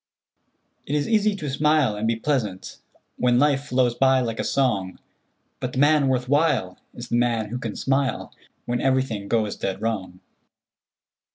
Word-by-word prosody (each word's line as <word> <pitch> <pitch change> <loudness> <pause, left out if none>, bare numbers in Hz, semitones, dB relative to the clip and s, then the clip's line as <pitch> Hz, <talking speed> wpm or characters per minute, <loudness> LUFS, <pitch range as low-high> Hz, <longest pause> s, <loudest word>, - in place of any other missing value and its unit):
"It 145 - -1
is 145 -1 0
easy 215 -2 +2
to 155 -6 -6
smile 150 -4 +2
and 105 +2 -2
be 115 - +1
pleasant 115 -7 -3 0.4
When 125 -1 +2
life 140 0 +2
flows 125 -3 +1
by 135 +1 +3
like 115 -3 -3
a - - 0
song; 105 -9 0 0.6
But 125 - -4
the - - -5
man 145 0 +4
worth 125 -1 0
while 145 - +1 0.2
Is 120 0 -8
the 120 - +1
man 115 -3 0
who 125 +3 -4
can 115 -4 -5
smile 135 0 -1 0.3
When 120 0 -2
everything 130 -6 0
goes 110 -2 0
dead 95 0 -4
wrong." 100 -5 -3
125 Hz, 165 wpm, -23 LUFS, 110-140 Hz, 0.6 s, man